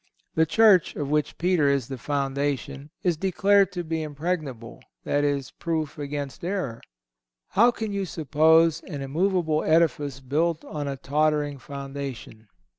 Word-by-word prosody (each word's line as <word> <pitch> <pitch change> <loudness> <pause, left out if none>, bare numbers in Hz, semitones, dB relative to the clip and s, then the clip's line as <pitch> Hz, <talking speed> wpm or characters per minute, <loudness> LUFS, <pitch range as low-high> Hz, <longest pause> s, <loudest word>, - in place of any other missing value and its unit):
The 160 0 +3
Church, 205 -2 +5
of 145 -2 -3
which 150 0 0
Peter 170 -5 +2
is 140 -4 0
the 135 - -5
foundation, 140 +1 -2
is 175 -3 +1
declared 195 +2 +3
to 175 -2 -3
be 160 0 -2
impregnable—that 145 -3 -4
is, 140 -2 -1
proof 160 -3 -3
against 145 0 -5
error. 175 - -3 0.7
How 235 +5 +5
can 220 -3 -3
you 200 -1 -2
suppose 160 +1 +3
an 145 -6 -6
immovable 160 +2 0
edifice 150 -4 +2
built 155 +5 -1
on 145 -2 -4
a 135 -1 -3
tottering 150 0 0
foundation? 135 -5 -7
150 Hz, 135 wpm, -25 LUFS, 140-170 Hz, 0.7 s, Church